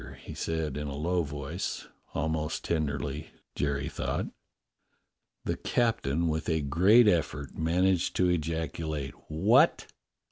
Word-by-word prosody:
he - - -9
said 80 -2 -2
in 75 0 -3
a 70 - -4
low 85 +4 +1
voice, 75 +4 -4 0.3
almost 80 0 -1
tenderly, 75 -2 -2 0.2
Jerry 70 0 -1
thought. - - -2 1.2
The - - -1
captain, 85 - +1
with 80 +1 -1
a 80 -1 +1
great 95 - +5
effort, 75 -6 0
managed 90 +2 +2
to 90 - +3
ejacu 80 -2 -1
late, 70 -3 -3
"What?" 100 - +4
80 Hz, 120 wpm, -29 LUFS, 75-90 Hz, 1.2 s, great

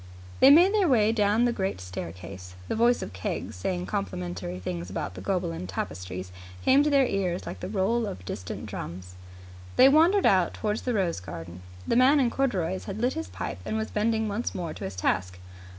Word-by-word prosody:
They 265 - +8
made 350 +7 +7
their 410 -4 +3
way 220 -6 +4
down 215 +1 +2
the 240 - +1
great 190 - -2
staircase. 90 0 -8
The - - -2
voice 235 +2 +3
of - - -7
Keggs, 95 -1 -4
saying 90 -1 -2
complimentary 90 -1 -4
things 90 -1 -5
about 95 0 -4
the 90 - -9
Gobelin 170 - -2
Tapestry, 90 0 -5 0.4
came 270 +2 +6
to 300 - +2
their 280 -2 +4
ears 185 -5 -1
like - - -6
the 180 - -5
roll 215 +3 +1
of 90 - -7
distant 90 -1 -6
drums. 90 +1 -7 0.6
They 265 - +8
wandered 335 +7 +5
out 185 -3 +3
towards 210 0 -2
the 250 -2 -1
rose 180 - 0
garden. 85 0 -8 0.3
The - - +1
man 270 +4 +6
in 245 -3 +2
corduroys 180 - -1
had 205 - -5
lit 245 +3 +1
his 110 - -4
pipe 90 -1 -5
and 220 - -2
was 220 0 -3
bending 220 +1 +1
once 210 +4 -3
more 170 -4 -4
to - - -7
his 95 0 -6
task. 90 0 -1
180 Hz, 200 wpm, -27 LUFS, -, 0.6 s, They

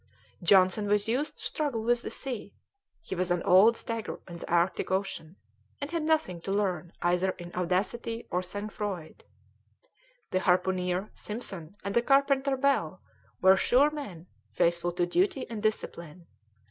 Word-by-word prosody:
Johnson 185 +3 +4
was 205 +1 +2
used 285 +6 -1
to - - -12
struggle 280 -8 -2
with 240 +1 +2
the - - -5
sea; 245 -7 -6 0.5
he 330 - -6
was 185 -1 -1
an 175 -1 +1
old 200 +6 +6
stager 230 -1 -4
in 170 -2 -8
the - - -8
Arctic 175 +2 +1
Ocean, 190 -3 -2 0.4
and 285 +2 -5
had 335 -1 -1
nothing 310 - 0
to 195 - -4
learn 185 -4 -1
either 180 +2 +2
in 175 0 -9
audacity 205 +6 -2
or 180 - +1
sang 205 +3 -5
froid. 195 -7 -5 1.1
The 185 - +2
harpooner, 185 +1 +1
Simpson, 200 -6 -7
and 200 - -3
the 235 - +4
carpenter, 275 +1 +3
Bell, 255 - +1 0.4
were 190 +1 +7
sure 270 +9 +4
men, 205 - -7 0.2
faithful 170 0 +1
to 175 0 +1
duty 355 - +1
and 220 -2 -4
discipline. 170 -6 -3
195 Hz, 155 wpm, -29 LUFS, 180-240 Hz, 1.1 s, were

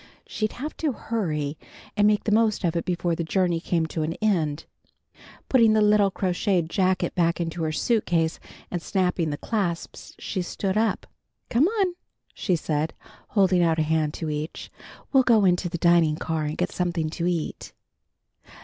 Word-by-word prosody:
She'd 215 -1 -3
have 290 +5 -6
to 305 -4 0
hurry, 155 -12 -3 0.4
and 205 0 +4
make 210 -1 +2
the 215 - -1
most 215 -1 +2
of 170 -1 0
it 170 - -1
before 175 -1 -1
the 170 - -2
journey 175 0 +1
came 165 -1 0
to 160 0 -4
an 155 +1 -1
end. 165 -8 0 0.8
Putting 230 -4 +5
the 215 - +3
little 210 -1 +4
crocheted 185 -2 0
jacket 185 -2 +1
back 170 -1 +1
into 165 0 -3
her 160 -1 0
suitcase 165 -3 0 0.3
and 175 - -2
snapping 180 -3 0
the 145 - -3
clasps 180 -5 -3
she 190 - -3
stood 190 +2 -2
up. 220 +1 +1 0.5
"Come 255 +7 +4
on," 390 -4 0 0.4
she 185 - 0
said, 155 -1 -2 0.3
holding 190 -3 +3
out 165 -2 +2
a 160 - +2
hand 155 -1 0
to 160 -2 -3
each. 150 +1 -5 0.4
"We'll 270 - +7
go 225 -5 +4
into 180 0 +2
the 170 - -3
dining 170 -2 +4
car 160 0 -2
and 150 +1 -3
get 180 +1 -1
something 170 -3 -1
to 170 +1 -2
eat." 170 -3 -3
175 Hz, 175 wpm, -25 LUFS, 160-210 Hz, 0.8 s, We'll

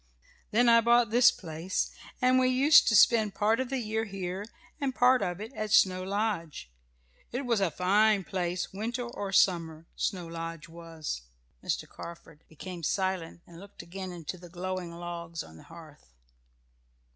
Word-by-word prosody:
"Then 240 +3 +3
I 230 0 +7
bought 235 -1 +4
this 240 +1 +7
place, 165 +1 -3 0.3
and 255 +1 +5
we 255 - +3
used 265 +4 +6
to 225 - +4
spend 215 -3 +5
part 215 +3 +2
of 260 -1 -2
the 270 - -1
year 220 -2 -2
here 195 -1 -5 0.3
and 270 -3 -2
part 250 +1 +4
of 180 -2 -2
it 220 +5 -7
at 215 -3 -4
Snow 185 -3 +4
Lodge. 190 - -3 0.6
It 255 +3 -3
was 235 -3 +1
a 190 - +2
fine 200 +5 +3
place 180 0 -3
winter 235 +5 -3
or 205 -5 -5
summer, 165 -4 +2
Snow 185 -4 -2
Lodge 165 +1 -6
was." 165 - -6 0.4
Mr. - - -2
Carford 165 -2 -11
became 175 +3 -8
silent 185 -1 -2
and 170 -1 -14
looked 200 -2 -12
again 185 +2 -7
into 175 +1 -7
the 175 0 -12
glowing 180 0 -4
logs 170 -1 -6
on 80 0 -14
the - - -14
hearth. 160 - -14
185 Hz, 165 wpm, -29 LUFS, 170-220 Hz, 0.6 s, I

